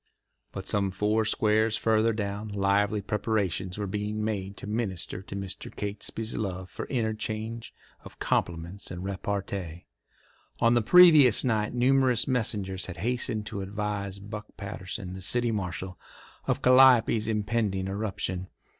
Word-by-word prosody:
But - - -7
some 100 -1 +1
four 105 +3 +1
squares 110 +1 +2
farther 110 0 +2
down 105 -1 -3
lively 100 0 +1
preparations 100 -3 -1
were 105 - -2
being 105 +2 -3
made 100 -2 -3
to - - -7
minister 105 -5 -3
to 95 - -9
Mr. 100 -1 -6
Catesby's 105 +2 -4
love 95 -3 -4
for - - -5
interchange 110 -1 -3 0.3
of - - -13
compliments 85 +3 -2
and 90 0 -6
repartee. 95 -3 -4 0.7
On 115 +1 +4
the 120 - +4
previous 155 -4 +7
night 110 -1 0
numerous 125 -1 +3
messengers 105 -7 0
had 95 -1 -7
hastened 110 +1 -1
to 105 -2 -5
advise 100 0 -3
Buck 105 +1 -8
Patterson, 100 -1 -6
the 95 - -8
city 120 +4 +1
marshal, 95 -2 -4 0.5
of - - 0
Calliope's 125 -4 +6
impending 105 -3 0
eruption. 95 -2 -3
105 Hz, 135 wpm, -28 LUFS, 95-110 Hz, 0.7 s, previous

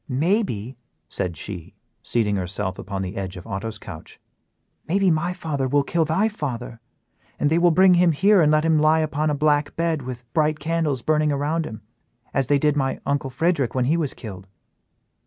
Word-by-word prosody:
Maybe," 135 - 0 0.3
said 90 -3 -3
she, 90 -4 -8 0.3
seating 105 -4 0
herself 95 0 -3
upon 95 -1 -4
the 95 +3 -5
edge 95 -2 -5
of 90 - -10
Otto's 105 +2 -5
couch; - - -11 0.7
"maybe 190 +1 +3
my 165 +3 0
father 155 -7 -2
will 140 +2 +2
kill 165 +3 0
thy 165 +8 +2
father, 125 - -5 0.6
and 145 - +1
they 165 - +3
will 175 0 +5
bring 185 +3 +5
him 175 -1 +4
here 195 +5 +4
and 150 -1 +4
let 155 +1 +3
him 160 -1 +3
lie 155 +1 +4
upon 155 0 0
a 150 - 0
black 145 0 +1
bed 165 -2 0
with 125 -1 -7
bright 155 -1 +2
candles 155 -4 -1
burning 155 -1 +2
around 150 +3 -1
him, 110 -1 -9 0.5
as 135 -3 +1
they 145 - +4
did 150 +1 +2
my 135 -2 -1
uncle 140 -1 -1
Frederick 145 -2 0
when 130 -1 +1
he 150 +6 +2
was 160 -5 -1
killed." 95 -4 -9
145 Hz, 190 wpm, -23 LUFS, 120-160 Hz, 0.7 s, will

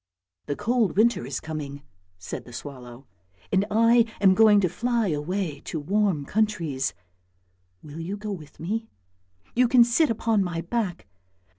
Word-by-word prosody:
" 90 0 -58
The 145 - -1
cold 225 - 0
winter 220 - +3
is 135 -2 -3
coming," 145 -3 -6 0.3
said 90 - -7
the 120 - -13
swallow, 125 -1 -9 0.2
" 90 +1 -32
and 195 +1 +2
I 230 +2 +5
am 195 -2 +6
going 215 0 +6
to 185 - +2
fly 230 +3 0
away 155 0 -2
to 160 - -4
warm 185 -2 0
countries. 170 -10 -1 0.9
Will 150 +1 -9
you 185 +5 -4
go 210 0 -5
with 155 -7 -9
me? 220 +7 -3 0.7
You 250 +1 +4
can 245 0 +6
sit 240 +7 +2
upon 225 -2 +1
my 170 -2 -3
back! 185 -1 -3
190 Hz, 160 wpm, -25 LUFS, 145-220 Hz, 0.9 s, am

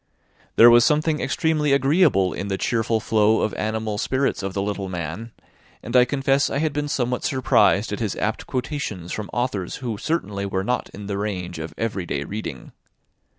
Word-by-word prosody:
There 120 +1 +9
was 120 0 +7
something 150 +2 +2
extremely 155 -3 +1
agreeable 140 - +3
in 100 - -4
the 95 -1 -1
cheerful 115 0 0
flow 110 0 +2
of 105 - 0
animal 110 -1 -2
spirits 130 0 0
of 95 -1 -4
the 100 - 0
little 100 -1 -3
man; 90 +6 -5 0.5
and 120 - -5
I 125 0 +7
confess 135 +1 +1
I - - -2
had 155 0 0
been 145 +1 -2
somewhat 125 -3 -1
surprised 130 -5 +2
at - - -3
his - - -2
apt - - -2
quotations 125 - -4
from 105 -1 -4
authors 115 -7 -2
who 115 -5 -5
certainly 105 -12 -2
were 95 -1 -2
not 125 +5 -1
in 100 - -9
the 100 0 -3
range 90 -5 -4
of 80 0 -7
every 105 -6 -2
day 70 -2 -2
reading. 85 - -6
110 Hz, 185 wpm, -23 LUFS, 100-135 Hz, 0.5 s, There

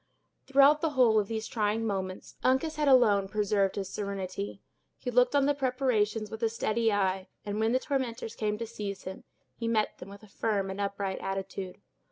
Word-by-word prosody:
Throughout 280 +2 +6
the 325 - +2
whole 225 -4 +6
of 205 - -1
these 220 0 -3
trying 215 0 0
moments, 190 -3 -4
Uncas 300 +5 +2
had 300 -1 +1
alone 215 -7 +5
preserved 200 -1 +1
his 195 -2 -3
serenity. 185 - -4 0.3
He 250 - -4
looked 250 +3 +4
on 280 -1 +4
the 290 - +3
preparations 250 -6 0
with 220 - -7
a 225 - +2
steady 225 0 0
eye, 190 -1 0 0.2
and 205 +1 -3
when 220 +1 +2
the 255 - +4
tormentors 255 -5 -3
came 210 -1 -1
to 230 - -4
seize 210 -3 -6
him, 190 +1 -8 0.3
he 230 - -4
met 220 -2 0
them 180 - -9
with 200 +1 -12
a - - -13
firm 200 -2 -1
and 195 +1 -4
upright 200 -1 -2
attitude. 195 -1 -5
215 Hz, 195 wpm, -29 LUFS, 200-245 Hz, 0.3 s, Throughout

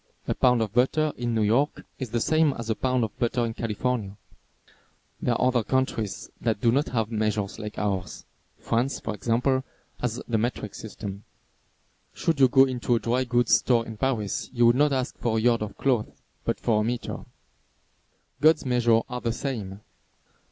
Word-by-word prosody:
A - - +1
pound 125 -3 +3
of 105 -2 -5
butter 145 +5 +2
in 120 -1 -2
New 110 - +2
York 120 +8 +1
is 130 -4 -4
the 120 +1 0
same 155 +3 +3
as 115 -2 -4
a - - 0
pound 130 0 0
of 110 -2 -3
butter 120 0 +1
in 115 - -3
California. 115 -2 -2 1.0
There 120 - +1
are 125 - +2
other 125 -2 +2
countries 115 -5 -1
that 110 -3 0
do 115 +2 +3
not 140 +5 +1
have 115 -2 -1
measures 105 -2 -1
like 105 0 -6
ours. 100 -3 -3 0.3
France, 120 +4 -1
for 110 - -4
example, 125 +5 +1 0.4
has 125 -1 -2
the 115 -2 +1
metric 110 -2 -2
system. 100 -2 -7 0.9
Should 165 -4 0
you 135 - +7
go 135 +2 +6
into 125 -2 0
a - - +1
dry 120 +4 0
goods 120 -1 +2
store 120 -2 +2
in 110 - -7
Paris 110 -5 -1
you 120 -2 +3
would 120 +1 +6
not 145 +2 +3
ask 130 -1 -2
for 110 -2 0
a - - +1
yard 115 0 +3
of 105 -1 -5
cloth, 125 -6 +1 0.4
but - - -1
for 110 -2 +2
a - - 0
meter. 120 +2 -3 1.2
God's 155 -1 +5
measures 120 -3 +3
are 125 0 -5
the 115 - 0
same. 110 -6 -4
120 Hz, 185 wpm, -26 LUFS, 110-130 Hz, 1.2 s, you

